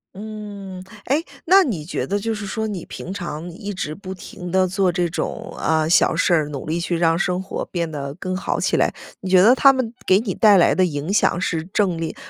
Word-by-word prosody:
嗯。 200 -3 -8 0.2
诶， 295 +5 +1 0.2
那 380 +3 +6
你 200 - -3
觉 175 - -3
得 200 +1 0
就 225 +2 -2
是 210 -1 -5
说 220 +3 -3
你 195 -5 -5
平 185 - -7
常 175 -3 -5
一 200 +4 -6
直 155 -5 -4
不 190 0 -7
停 180 -1 -9
地 185 0 +3
做 185 0 +1
这 175 0 0
种， 165 - -4
啊， 160 -1 +1
小 175 - +4
事， 165 -4 +2
努 140 -3 -6
力 160 +2 -1
去 170 0 -1
让 165 -1 +2
生 180 0 0
活 190 - -5
变 170 -2 -2
得 140 -2 -5
更 185 +2 -4
好 190 - -2
起 - - +1
来。 - - +2 0.3
你 190 - -5
觉 185 -1 +6
得 225 +6 +7
他 275 +1 +7
们 250 -3 -2
给 190 - +5
你 210 -4 -3
带 210 -3 +6
来 175 - +5
的 185 - +3
影 155 +1 -3
响 190 -4 +2
是 165 -3 -1
正 190 -5 +1
力 165 -1 -4
185 Hz, 245 characters per minute, -21 LUFS, 170-205 Hz, 0.3 s, 得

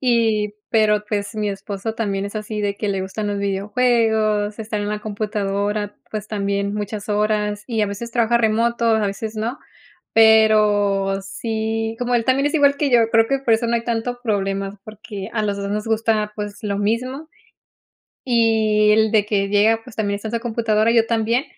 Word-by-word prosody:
y 225 -4 +1 0.2
pero, 210 -1 +3
pues, 205 +1 -3
mi 210 -1 -1
esposo 200 +2 -5
también 200 -4 -2
es 200 - -6
así 215 0 -4
de 200 -1 -1
que 210 - -3
le 195 -1 -1
gustan 200 +3 -4
los 205 0 -2
videojuegos, 215 +1 +1
estar 215 -1 -3
en 205 - -3
la 210 0 -2
computadora, 205 -1 -2
pues, 215 -1 -5
también 200 -1 -2
muchas 210 0 -5
horas 210 0 0
y 225 -3 -1
a - - +2
veces 205 +4 -6
trabaja 235 0 +2
remoto, 235 +1 +1
a 220 -2 +3
veces 215 +2 -5
no. 225 +4 -2 0.6
Pero 210 -3 +4
sí 225 +2 -3
como 245 0 -1
él 230 - 0
también 265 +3 +2
es 290 - -1
igual 285 -2 +4
que 285 -1 0
yo, 235 -2 +4
creo 225 -1 +4
que 275 - +1
por 235 -4 +3
eso 230 +2 -1
no 235 - +1
hay 230 - -4
tanto 240 +1 -2
problema, 195 -2 -2
porque 210 -2 -8
a 215 - -1
los 205 -1 -1
dos 200 0 -4
nos 210 +1 -2
gusta, 220 -1 0
pues 205 -1 -5
lo 200 -2 -2
mismo, 255 +8 -2 1.0
y 220 -3 +3
él 220 0 +3
de 215 -2 +4
que 200 -2 0
llega, 215 +3 +3
pues, 225 - -13
también 205 -2 -1
está 205 +2 -6
en 225 - -5
su 230 - 0
computadora, 225 -2 +1
yo 230 -1 +4
también, 230 +3 +1
215 Hz, 190 wpm, -21 LUFS, 205-225 Hz, 1.0 s, Pero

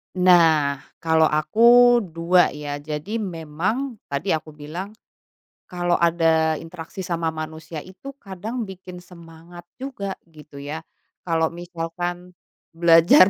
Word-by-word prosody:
Nah, 165 -6 +5 0.2
kalau 160 -1 +4
aku 235 +11 +5
dua, 170 +1 +2
ya. 145 -1 -5
Jadi 155 +9 -4
memang 190 - -3
tadi 140 +7 -3
aku 155 -2 -1
bilang, 165 +7 -7 0.8
kalau 175 -1 -1
ada 165 -2 +3
interaksi 165 +3 -8
sama 170 -1 -1
manusia 155 0 -7
itu 265 +10 -11
kadang 215 +4 -5
bikin 185 -1 -10
semangat 170 -1 -13 0.2
juga, 250 -8 -5
gitu 150 -3 -15
ya. 145 +3 -6 0.4
Kalau 165 -1 0
misalkan 175 +1 -5 0.4
belajar 170 +2 +6
170 Hz, 115 wpm, -23 LUFS, 160-185 Hz, 0.8 s, belajar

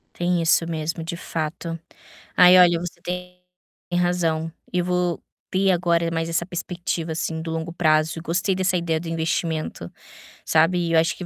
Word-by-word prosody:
Tem 175 0 0
isso 165 0 +3
mesmo, 165 0 -3
de 165 +1 -4
fato. 165 0 -4 0.6
Aí 180 0 +8
olha, 175 -2 +6
você 175 0 -7
tem 180 +1 -6 0.5
razão. 170 -2 0 0.2
Eu 180 -1 +1
vou 180 -1 -1 0.3
ter 190 +1 +3
agora 170 -1 +1
mais 165 0 -2
essa 170 +1 0
perspectiva 175 -2 -4
assim 160 0 -3
do 165 0 -5
longo 165 +1 -4
prazo. 160 -1 +2
Gostei 180 +4 0
dessa 185 -1 +1
ideia 165 -2 -1
do 170 - -8
investimento, 160 - -2 0.5
sabe. 165 +2 +2
Eu 165 - +5
acho 165 +1 +1
que 180 - -6
170 Hz, 160 wpm, -23 LUFS, 165-180 Hz, 0.6 s, Aí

